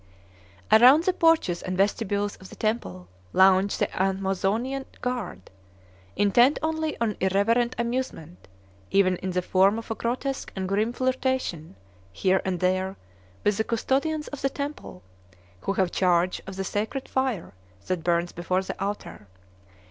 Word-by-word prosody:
Around 255 Hz, +8 st, +8 dB
the 370 Hz, -, +2 dB
porches 325 Hz, -, +2 dB
and 185 Hz, 0 st, -4 dB
vestibules 205 Hz, 0 st, 0 dB
of 190 Hz, -, -13 dB
the -, -, -11 dB
temple 155 Hz, -, -3 dB, 0.3 s
lounged 190 Hz, +1 st, +4 dB
the -, -, -1 dB
Amazonian 195 Hz, +7 st, -1 dB
guard, 240 Hz, -, -4 dB, 0.6 s
intent 240 Hz, +7 st, +4 dB
only 315 Hz, -1 st, -1 dB
on 225 Hz, -3 st, 0 dB
irreverent 225 Hz, +6 st, +2 dB
amusement, 235 Hz, -, -4 dB, 0.4 s
even 185 Hz, -2 st, +3 dB
in 190 Hz, -, -4 dB
the 180 Hz, 0 st, -1 dB
form 195 Hz, +4 st, +3 dB
of 230 Hz, 0 st, -7 dB
a -, -, +2 dB
grotesque 255 Hz, +4 st, -3 dB
and 190 Hz, -1 st, -3 dB
grim 210 Hz, +4 st, +1 dB
flirtation 255 Hz, -, -2 dB, 0.4 s
here 185 Hz, -, +1 dB
and 185 Hz, -2 st, -2 dB
there 185 Hz, +1 st, 0 dB, 0.5 s
with 205 Hz, -1 st, +2 dB
the 220 Hz, -, +1 dB
custodians 280 Hz, +7 st, -1 dB
of 290 Hz, -, -7 dB
the 275 Hz, -, +1 dB
temple, 280 Hz, -, -6 dB, 0.6 s
who 195 Hz, -, -2 dB
have 190 Hz, -3 st, +1 dB
charge 180 Hz, -1 st, +2 dB
of 195 Hz, -, -7 dB
the 195 Hz, -, -3 dB
sacred 215 Hz, +7 st, -3 dB
fire 260 Hz, -, -2 dB, 0.3 s
that 180 Hz, -3 st, -2 dB
burns 170 Hz, +1 st, +1 dB
before 180 Hz, +2 st, -1 dB
the 190 Hz, -, -5 dB
altar. 200 Hz, -, -5 dB
200 Hz, 145 wpm, -26 LUFS, 185-250 Hz, 0.6 s, Around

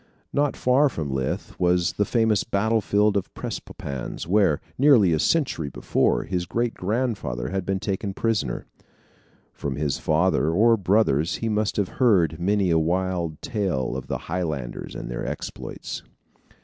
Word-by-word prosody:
Not 145 Hz, 0 st, +1 dB
far 135 Hz, +3 st, +4 dB
from 75 Hz, -, -4 dB
Leith 65 Hz, -1 st, -2 dB
was 90 Hz, -1 st, +2 dB
the 105 Hz, -, +1 dB
famous 110 Hz, -2 st, +2 dB
battlefield 105 Hz, 0 st, +2 dB
of 100 Hz, -, -1 dB
Prestonpans, 70 Hz, -3 st, -5 dB
where, 95 Hz, -5 st, +3 dB, 0.2 s
nearly 120 Hz, -, +5 dB
a 80 Hz, -, +1 dB
century 125 Hz, -, +1 dB
before, -, -, +1 dB
his 90 Hz, 0 st, -2 dB
great 120 Hz, +3 st, -1 dB
grandfather 95 Hz, -, -2 dB
had 95 Hz, -1 st, -3 dB
been 95 Hz, -1 st, 0 dB
taken 95 Hz, 0 st, -3 dB
prisoner. 105 Hz, -, -1 dB, 0.9 s
From 70 Hz, -2 st, -4 dB
his 75 Hz, -1 st, -1 dB
father 80 Hz, -1 st, +2 dB
or 110 Hz, +8 st, +5 dB
brothers 90 Hz, -6 st, +2 dB
he 115 Hz, -, -2 dB
must 105 Hz, -1 st, 0 dB
have 100 Hz, -3 st, +1 dB
heard 90 Hz, -, +4 dB
many 95 Hz, 0 st, +2 dB
a 80 Hz, -, +4 dB
wild 85 Hz, -1 st, -1 dB
tale 95 Hz, -, -1 dB
of 65 Hz, -, -5 dB
the -, -, -2 dB
Highlanders 80 Hz, -8 st, -4 dB
and -, -, -6 dB
their -, -, -4 dB
exploits. -, -, -6 dB
95 Hz, 150 wpm, -24 LUFS, 80-110 Hz, 0.9 s, nearly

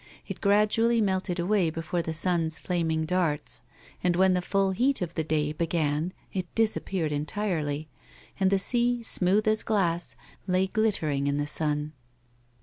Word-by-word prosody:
It -, -, -7 dB
gradually 215 Hz, +3 st, +3 dB
melted 190 Hz, -3 st, 0 dB
away 180 Hz, -1 st, +2 dB
before 165 Hz, +2 st, -3 dB
the 160 Hz, -1 st, -4 dB
sun's 165 Hz, -2 st, +1 dB
flaming 160 Hz, -1 st, -1 dB
darts, 155 Hz, -7 st, 0 dB, 0.4 s
and 175 Hz, -1 st, +2 dB
when 190 Hz, +1 st, +4 dB
the 180 Hz, -, +1 dB
full 195 Hz, +1 st, +1 dB
heat 255 Hz, +8 st, +1 dB
of 175 Hz, -2 st, -4 dB
the 160 Hz, -, -1 dB
day 150 Hz, -1 st, 0 dB
began 160 Hz, 0 st, -1 dB, 0.2 s
it 185 Hz, -2 st, -2 dB
disappeared 195 Hz, -7 st, +1 dB
entirely, 155 Hz, -1 st, -2 dB, 0.5 s
and 190 Hz, -1 st, +3 dB
the 195 Hz, -, +3 dB
sea, 240 Hz, +4 st, +1 dB
smooth 200 Hz, +1 st, +1 dB
as 215 Hz, 0 st, +3 dB
glass, 175 Hz, -5 st, 0 dB, 0.3 s
lay 185 Hz, +1 st, +2 dB
glittering 175 Hz, -9 st, 0 dB
in 140 Hz, 0 st, 0 dB
the 145 Hz, -, 0 dB
sun. 150 Hz, 0 st, 0 dB
180 Hz, 150 wpm, -27 LUFS, 155-200 Hz, 0.5 s, when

